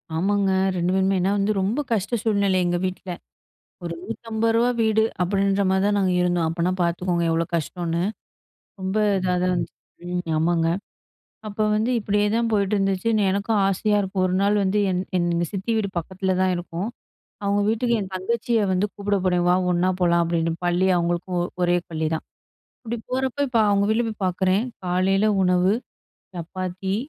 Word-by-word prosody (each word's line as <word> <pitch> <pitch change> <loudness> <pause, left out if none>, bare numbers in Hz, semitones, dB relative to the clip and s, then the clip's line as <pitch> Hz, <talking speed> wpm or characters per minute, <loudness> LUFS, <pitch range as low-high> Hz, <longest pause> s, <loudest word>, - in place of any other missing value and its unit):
ஆமாங்க. 195 +2 +1 0.3
2 175 +1 0
பேருமே. 190 0 +2
ஏன்னா 195 +2 +1
வந்து 200 +2 +1
ரொம்ப 215 +9 0
கஷ்ட 220 +2 0
சூழ்நிலை 200 -4 +2
எங்க 175 0 +1
வீட்ல. 185 0 -5 0.7
ஒரு 170 0 -3
ரூ.150 225 +2 0
வீடு 220 0 +3 0.2
அப்படின்ற 195 +2 +1
மாதிரி 190 +1 +2
தான் 205 0 +2
நாங்க 185 -2 +2
இருந்தோம். 175 -2 +1
அப்பன்னா 170 +2 0
பார்த்துக்கோங்க 170 0 0
எவ்ளோ 165 +1 +1
கஷ்டோன்னு. 170 +1 -2 0.8
ரொம்ப 190 +2 -2 0.2
இதா 180 -1 0
தான் 185 - +2
இருந்துச்சு. 180 - -2 0.3
ம். 180 0 -2 0.2
ஆமாங்க. 165 0 +2 0.8
அப்ப 205 +1 -8
வந்து 220 +4 +1
இப்படியேதான் 210 +3 +1
போயிட்டுருந்துச்சுன்னு 200 +1 +1
எனக்கும் 200 +2 0
ஆசையா 210 +2 +1
இருக்கும் 190 -1 -1
ஒரு 185 - -1
நாள் 205 +1 +3
வந்து 195 +2 +1
என் 180 0 0 0.2
என் 175 -1 +1 0.2
சித்தி 195 +4 -3
வீடு 205 -2 0
பக்கத்தில 185 +2 -2
தான் 185 -1 +2
இருக்கும். 175 +4 -4 0.6
அவங்க 200 0 +1
வீட்டுக்கு 235 +1 +1
என் 190 0 -6
தங்கச்சிய 230 +4 0
வந்து 185 +2 +1
கூப்பிட 205 0 -1
போனேன், 180 -1 +2
"வா 180 - +5 0.2
ஒண்ணா 175 +1 +2
போலாம்." 170 -1 +3
அப்படின்னு. 165 -1 0
பள்ளி 175 +2 +2
அவங்களுக்கும் 175 +1 -1 0.2
ஒரே 175 0 +3
பள்ளிதான், 160 0 -2 0.6
இப்படி 235 0 -4
போறப்போ 265 +1 -1
இப்ப 235 -2 +1
அவங்க 200 0 +3
வீட்ல 225 +2 +2
போய் 210 -2 -7
பார்க்குறேன் 185 +3 +1 0.2
காலையில 190 +3 +2 0.2
உணவு 180 +1 +3 0.6
சப்பாத்தி 185 +2 -4
190 Hz, 155 wpm, -23 LUFS, 180-210 Hz, 0.8 s, வா